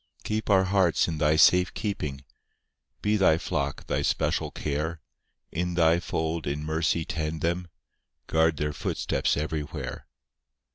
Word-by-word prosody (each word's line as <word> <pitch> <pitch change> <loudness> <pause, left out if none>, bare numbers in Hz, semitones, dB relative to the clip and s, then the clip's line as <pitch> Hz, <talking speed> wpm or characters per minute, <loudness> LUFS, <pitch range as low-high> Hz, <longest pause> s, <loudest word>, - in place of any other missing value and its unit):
III - - -32
Keep 110 +1 -2
our 95 -2 +5
hearts 95 -3 +2
in 80 -2 -3
Thy 75 +1 +3
safe 90 +3 +5
keeping, 75 - -3 0.8
Be 105 +1 +2
Thy 90 -5 +4
flock 70 -3 -3
Thy - - -1
special - - 0
care; 75 +3 -3 0.5
In 90 +1 -2
Thy 85 0 +4
fold 80 -2 -2
in 75 +1 -2
mercy 80 +1 0
tend 80 -1 -3
them, 85 +1 -1 0.6
Guard 80 -1 +2
their 75 0 -1
footsteps 75 - -1
everywhere. 75 -3 -4
80 Hz, 140 wpm, -27 LUFS, 75-90 Hz, 0.8 s, our